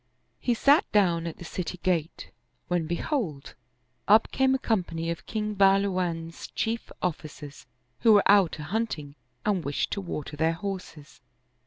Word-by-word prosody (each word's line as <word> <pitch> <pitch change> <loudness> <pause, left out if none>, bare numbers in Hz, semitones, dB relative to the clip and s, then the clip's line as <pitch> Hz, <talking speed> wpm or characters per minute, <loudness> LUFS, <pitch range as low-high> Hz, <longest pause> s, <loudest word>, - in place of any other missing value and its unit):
He 245 - +1
sat 280 +6 +4
down 170 -5 +2
at 165 - -6
the 175 - -10
city 180 +1 -5
gate, 170 -3 -1 0.4
when 175 -3 0
behold, 175 - -3 0.5
up 215 +2 +5
came 265 0 +3
a - - +2
company 170 -9 -1
of 170 - -7
King 215 -1 -2
Bahlu 195 0 +4
wan's 165 -2 -3
chief 225 +1 -2
officers, 150 -5 -5 0.3
who 225 -2 +6
were 205 - +6
out 200 -5 +5
a 150 - -6
hunting 160 -5 -3 0.3
and 200 -5 +1
wished 140 0 -2
to 200 - -2
water 150 -5 -5
their 160 +2 +1
horses. 165 -5 -7
180 Hz, 155 wpm, -27 LUFS, 165-210 Hz, 0.5 s, who